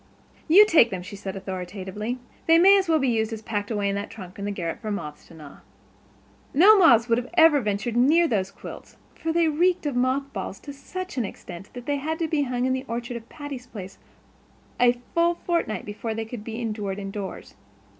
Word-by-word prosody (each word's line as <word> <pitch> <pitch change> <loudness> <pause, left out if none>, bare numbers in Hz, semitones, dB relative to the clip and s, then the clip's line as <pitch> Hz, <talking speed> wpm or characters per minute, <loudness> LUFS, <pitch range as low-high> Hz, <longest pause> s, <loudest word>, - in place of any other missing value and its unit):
"You 380 +6 +8
take 320 - +5
them," 185 -3 -5
she 195 +2 -9
said 195 -1 -6
authoritatively. 190 +4 -5 0.3
"They 330 0 +7
might 390 +3 +7
as 380 -3 -2
well 320 - +4
be 270 -4 +1
in - - +2
use 220 0 0
as 220 -1 -6
packed 205 -2 -3
away 205 -3 -1
in 200 - 0
that 200 +1 -4
trunk 190 -4 -10
in 200 - -4
the 205 - -2
garret 170 -4 -4
for 215 - -5
moths 150 -8 -6
to 165 - -15
gnaw." 150 -3 -12 1.0
No 390 +9 +8
moths 235 -10 +6
would 240 +1 0
ever 325 -3 +7
have 260 - -2
ventured 210 +3 -2
near 310 +8 +4
those 195 -8 0
quilts, - - -11 0.2
for 325 - -3
they 335 0 +3
reeked 345 +3 +1
of 285 -3 -1
mothballs 255 -6 -1
to 285 - -8
such 370 +4 -7
an - - +1
extent 180 -1 -9
that 245 -1 -9
they 285 0 0
had 315 +3 -3
to 330 - -1
be 310 -2 0
hung 250 -2 -1
in 260 - +1
the 260 0 -2
orchard 240 +1 -4
of 235 0 -9
Patty's 280 -4 -8
Place 195 -5 -9 0.8
a 245 0 +4
full 340 0 +3
fortnight 335 - -2
before 220 +2 -5
they 225 0 -3
could 225 -1 -8
be 225 +1 -6
endured 210 -4 -3
indoors. 195 -1 -6
235 Hz, 215 wpm, -25 LUFS, 200-295 Hz, 1.0 s, You